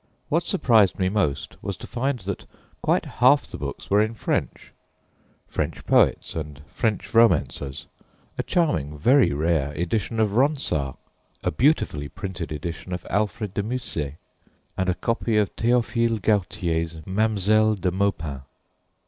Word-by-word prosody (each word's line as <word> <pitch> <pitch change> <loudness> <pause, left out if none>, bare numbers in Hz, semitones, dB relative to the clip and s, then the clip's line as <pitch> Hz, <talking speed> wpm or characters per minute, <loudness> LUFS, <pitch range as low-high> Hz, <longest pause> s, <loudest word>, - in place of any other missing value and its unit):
What 170 +3 +1
surprised 110 - +4
me 95 -1 +1
most 95 -9 -1
was - - -4
to - - -9
find 130 +2 -1
that 95 +1 -5 0.3
quite - - +1
half - - +4
the - - -9
books - - -6
were 100 +1 +5
in 110 +1 -1
French - - -3 0.7
French - - -3
poets - - +3
and 75 -3 -5
French 105 -3 -2
romancers: 85 -11 +2 0.5
a - - -1
charming, 110 - 0
very 130 - +4
rare 75 -1 +1
edition 105 +8 -2
of 105 -2 +2
Ronsard, 120 - +1 0.5
a - - +1
beautifully 100 - +1
printed 95 -5 -6
edition 85 +4 -5
of 90 - -5
Alfred 105 0 -1
de 100 - 0
Musset, 100 - -3 0.6
and 95 0 0
a 90 - +1
copy 115 +1 0
of 105 -2 +1
Théophile 115 -1 +1
Gautier's 90 -5 0
Mademoiselle 110 +1 +2
de 90 -2 -1
Maupin. 85 -8 -1
100 Hz, 140 wpm, -24 LUFS, 85-115 Hz, 0.7 s, were